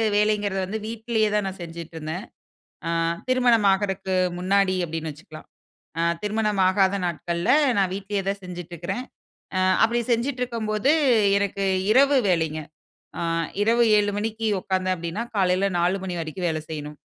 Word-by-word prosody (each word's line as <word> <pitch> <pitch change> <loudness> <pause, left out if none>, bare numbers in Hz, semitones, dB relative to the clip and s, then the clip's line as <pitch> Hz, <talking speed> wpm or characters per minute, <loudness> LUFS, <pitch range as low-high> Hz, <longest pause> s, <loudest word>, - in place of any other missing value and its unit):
வேலைங்கிறது 205 -2 +1
வந்து 215 +4 -4
வீட்டிலேயே 225 -1 0
தான் 210 -2 +1
நான் 190 -1 -6
செஞ்சிட்டுருந்தேன். 165 +2 -6 0.6
ஆ, - - 0 0.4
திருமணம் 245 -5 +3
ஆகுறக்கு 190 -1 -1 0.2
முன்னாடி 190 +1 +2
அப்பிடின்னு 160 -1 -4
வச்சுக்கலாம். 155 +1 -13 0.5
ஆ - - +1 0.2
திருமணம் 210 -1 0
ஆகாத 190 0 +3
நாட்கள்ல 170 +3 -1 0.3
நான் 190 -2 +2
வீட்டிலேயே 200 0 -3
தான் 200 0 -2
செஞ்சுட்டு 175 -1 -8
இருக்கிறேன். 245 +9 -4 0.5
ஆ - - +2 0.2
அப்பிடி 235 +2 +3
செஞ்சுட்டுருக்கும்போது 235 -1 0 0.5
எனக்கு 200 0 -1 0.3
இரவு 275 +4 +5
வேலைங்க. 160 -3 0 0.6
ஆ - - -3 0.4
இரவு 230 +2 +3 0.2
7:00 205 0 +1
மணிக்கு 220 +1 -2
உட்கார்ந்தேன் 185 0 0
அப்பிடின்னா, 170 +7 -4
காலையில 190 0 +2
4:00 180 +3 +1
மணி 180 -2 -4
வரைக்கும் 170 +3 -3
வேலை 155 -1 -3
செய்யணும். 150 -1 -5
195 Hz, 135 wpm, -24 LUFS, 175-215 Hz, 0.6 s, இரவு